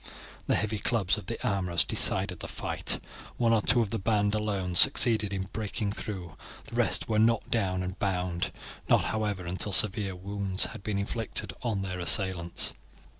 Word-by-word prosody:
The - - +3
heavy 105 +3 -1
clubs 105 -2 0
of - - -12
the 115 - -3
armourers 90 -4 +2
decided - - +2
the - - -5
fight. - - -2 0.4
One 115 -1 +3
or 110 - +3
two 120 +3 +3
of 105 -3 -2
the 115 - -2
band 105 0 +1
alone 100 -4 -2
succeeded 110 -2 +4
in 95 -1 -3
breaking 105 -1 -3
through, 90 -6 -7 0.3
the - - -14
rest - - +1
were 110 -1 +1
knocked 115 0 +2
down 95 -5 0
and 90 +1 -6
bound; 90 -3 -1 0.4
not, - - +4
however, 105 -4 -2
until 95 +4 +1
several 100 0 +6
severe 100 -3 -3
wounds 95 0 -2
had - - -8
been 105 0 -2
inflicted 105 +2 -2
on 110 -5 -2
their 90 -1 -4
assailants. 90 -1 +2
100 Hz, 175 wpm, -28 LUFS, 95-110 Hz, 0.4 s, several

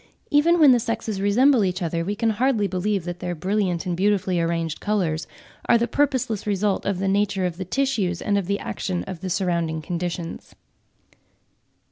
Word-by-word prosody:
Even 325 +4 +4
when 295 -4 +8
the 245 - +5
sexes 225 -3 -3
resemble 240 +4 +4
each 185 -1 -1
other, 165 -2 -2
we 200 +4 -2
can 230 +1 +1
hardly 225 -1 +1
believe 195 0 -1
that 175 0 -6
their 175 -1 -3
brilliant 185 0 -1
and 180 -1 -1
beautifully 190 -2 +1
arranged 165 -1 -1
colours 180 -7 -1 0.4
are - - +7
the 235 +1 0
purposeless 255 -5 0
result 200 -1 0
of 200 -2 0
the 195 +1 -1
nature 200 -1 +1
of 175 -2 -3
the 190 - -4
tissues 205 -6 0
and 205 - 0
of 200 -3 0
the 200 +1 0
action 185 -3 -3
of 185 -3 -7
the 185 +1 -5
surrounding 170 -3 -1
conditions. 170 +1 -5
195 Hz, 180 wpm, -23 LUFS, 175-215 Hz, 0.4 s, when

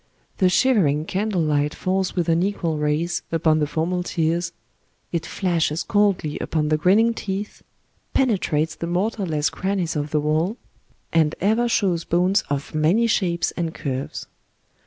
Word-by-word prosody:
The 185 - +4
shivering 180 - +3
candlelight 160 -8 0
falls 190 0 -1
with 175 -3 0
unequal 170 -2 0
rays 150 +4 0
upon 160 -1 +2
the 150 - +1
formal 170 +4 -1
tiers; 170 0 -1 0.6
it 170 -1 -2
flashes 170 -4 0
coldly 195 -7 +1
upon 150 -2 -1
the 155 - +3
grin 180 +5 +4
ning 230 +1 +3
teeth, 205 -1 -5 0.5
penetrates 175 - +1
the 170 - -5
mortarless 175 -5 0
crannies 190 -4 -2
of 150 0 -2
the 150 - +1
wall, 155 +8 0 0.6
and 160 -1 +3
ever 220 +5 +2
shows 180 -7 +1
bones 180 +4 +2
of 145 0 -3
many 165 +10 +3
shapes 180 -6 +1
and 165 -2 -3
curves. 135 -1 -4
170 Hz, 140 wpm, -22 LUFS, 155-195 Hz, 0.6 s, The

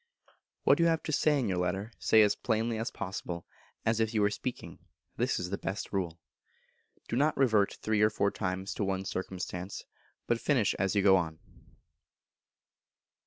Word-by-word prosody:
What - - +5
you 170 - +5
have 165 -1 +1
to - - -3
say 150 0 +3
in 130 - 0
your 95 -2 0
Letter, 95 +5 -2
say 110 -1 +5
as 105 - +4
plainly 115 0 -1
as 115 - -2
possible, 90 -2 -5 0.4
as 115 0 +2
if 110 0 0
you 105 - +3
were 100 - +3
speaking; 125 +3 -5 0.4
this - - +1
is 90 0 -4
the 100 - -2
best 100 +2 -4
rule. 85 -4 -2 0.9
Do - - -2
not 145 +4 +2
revert 110 -7 +3
three 110 -1 +1
or 105 - +6
four 100 -2 +1
times 95 -1 -3
to - - -2
one 95 -1 -1
circumstance, 95 0 -5 0.4
but 120 -1 0
finish 130 -8 +2
as 95 +1 +1
you 100 - +3
go 95 -1 +7
on. 80 -3 -2
105 Hz, 175 wpm, -30 LUFS, 95-115 Hz, 0.9 s, go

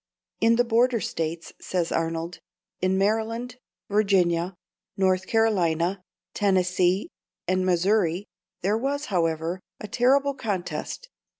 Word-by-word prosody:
"In 230 +1 +4
the 245 - +4
Border 240 +1 +3
States," 165 -2 -4
says 175 -3 -1
Arnold 165 +1 -2 0.4
"in 185 +1 +2
Maryland, 225 +4 -1 0.3
Virginia, 190 -4 +2 0.4
North 185 -1 +2
Carolina, 185 -5 +1 0.3
Tennessee, 185 - +2 0.4
and 185 +1 +1
Missouri 185 0 +2 0.4
there 205 +4 +2
was, 285 +4 -1
however, 165 0 0 0.2
a 210 - -6
terrible 275 +6 +3
contest." 205 - -4
190 Hz, 105 wpm, -25 LUFS, 175-225 Hz, 0.4 s, In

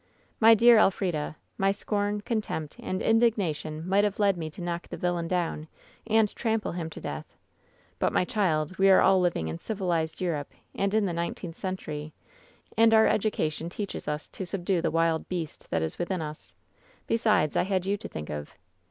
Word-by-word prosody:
" - - -38
'My 225 0 +8
dear 235 +1 +7
Elfrida, 180 -7 +1 0.2
my 195 0 +3
scorn, 205 +1 -1
contempt 205 -9 -3
and 185 - -3
indigna 225 -7 +3
tion 155 +2 -7
might 195 +2 +3
have 205 -1 0
led 200 -2 +3
me 160 -2 -4
to 155 - -12
knock 175 0 -3
the - - -7
villain 175 -1 -1
down 170 -3 -1 0.4
and 220 -2 +3
trample 225 -2 -1
him 170 -2 -4
to - - -9
death. 75 +1 -7 0.6
But, - - +2
my - - +2
child, 180 -6 0
we 195 0 +6
are 190 - +7
all 190 -1 +5
living 170 - 0
in 80 +1 -4
civilized 175 -6 -2
Europe 165 -6 -2 0.2
and 200 +1 0
in 215 -2 +3
the 180 - -1
nineteenth 170 0 -4
century, 155 -6 -5 0.6
and 225 0 +5
our 220 - +6
education 170 -6 0
teaches 200 +2 -5
us 150 0 -3
to - - -6
subdue 180 -1 -1
the 165 - +1
wild 165 0 +1
beast 170 -4 -5
that 80 -1 0
is 80 - -4
within 180 +1 -1
us. 150 0 -9 0.5
Besides, 215 -10 +2
I - - +4
had 190 -1 0
you 200 +1 +1
to - - -7
think 75 -1 -7
of. 75 -1 -6
180 Hz, 190 wpm, -27 LUFS, 160-205 Hz, 0.6 s, My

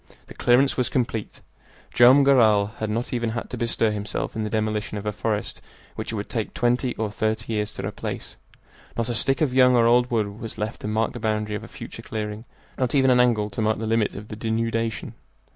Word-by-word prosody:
The - - -12
clearance 130 +3 +3
was 125 - +1
complete. 115 -4 -2 0.5
Joam 130 +4 +7
Garral 110 -7 +5
had 110 - -2
not 115 +4 -2
even 120 -2 0
had 115 +1 -5
to - - -3
bestir 115 -1 +1
himself 105 0 -4
in 110 - -2
the 105 - -2
demolition 110 -1 -1
of 100 - -6
a 105 - 0
forest 105 0 -3 0.3
which - - -4
it - - -4
would 100 -1 -4
take 110 -3 -3
twenty 125 +1 +1
or 110 -2 -2
thirty 110 +1 -2
years 105 -1 -1
to - - -5
replace. - - -6 0.6
Not 115 0 -1
a - - 0
stick 135 +5 +1
of 140 -5 +2
young 125 -1 +6
or 115 -1 +4
old 120 +1 +4
wood 105 -3 -1
was 115 - -6
left 105 +2 -4
to - - -4
mark 110 +1 0
the 120 - -6
boundary 105 -1 -1
of 105 - -5
a - - -9
future - - -9
clearing, 105 +1 -5 0.3
not 130 +1 0
even 130 -2 +5
an 125 - +4
angle 110 -4 +2
to 95 - -3
mark 110 0 +1
the 110 - -4
limit 110 -1 +1
of 105 +2 -8
the 105 - -6
denudation. 115 -1 -2
110 Hz, 225 wpm, -24 LUFS, 105-120 Hz, 0.6 s, Joam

